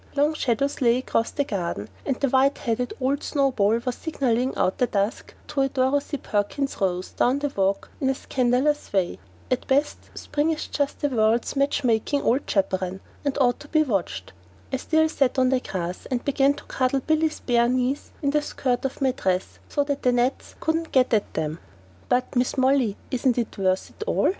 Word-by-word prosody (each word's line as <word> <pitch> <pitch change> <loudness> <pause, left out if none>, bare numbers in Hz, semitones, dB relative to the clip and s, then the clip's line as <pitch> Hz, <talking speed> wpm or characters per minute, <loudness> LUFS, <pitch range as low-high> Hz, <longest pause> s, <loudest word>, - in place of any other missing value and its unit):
Long 295 +2 +3
shadows 275 -1 -1
lay 240 -1 +4
across 230 -3 0
the 285 - -1
garden, 170 - -3 0.2
and 260 - 0
the 280 - +2
white 270 +2 +3
headed 240 +1 -1
old 275 +2 0
snow 275 -2 +1
ball 215 -2 +2
was 250 - 0
signalling 255 -5 0
out - - +3
of - - -27
the 250 - +3
dusk 200 +1 -2
to 295 -2 0
a 270 - +2
Dorothy 280 +2 0
Perkins 220 +4 -2
rose 185 -1 -1
down 250 +3 +2
the 285 -1 -2
walk 195 0 0
in 265 - +2
a 270 - +1
scandalous 260 +4 0
way. 185 - 0 0.3
At 255 - 0
best, 285 +2 0
spring 295 +2 -1
is 315 -1 -1
just 285 -1 -2
the 290 - +2
world's 225 0 +1
match 280 +1 +1
making 245 +4 +1
old 260 +5 +1
chaperon, 190 -1 0 0.2
and 285 -1 -1
ought 245 -3 +2
to 295 - -12
be 310 0 +3
watched. 195 - -2 0.4
I - - +2
still 315 +4 +2
sat 275 -4 +1
on 255 -1 +4
the 260 -1 +2
grass, 180 -6 -5
and 255 -2 0
I - - -24
began 280 0 +3
to 290 - -11
cuddle 260 +1 0
Billy's 315 +2 +1
bare 235 -1 +3
knees 255 +2 0
in 280 - +2
the 300 +1 +2
skirt 255 -4 -1
of 270 - -4
my 265 -1 +3
dress 185 -6 -2
so 290 - +1
the 280 -3 0
gnats 245 +2 0
couldn't 325 0 -1
get 255 -2 +3
at 210 -2 +1
them. 155 +1 -2 0.5
"But, 250 0 +1
Mrs. 250 +1 0
Molly, 260 -5 +3
isn't 255 -1 +1
it 235 -2 -2
worth 185 -1 0
it - - -7
all?" - - +2
255 Hz, 200 wpm, -24 LUFS, 225-280 Hz, 0.5 s, lay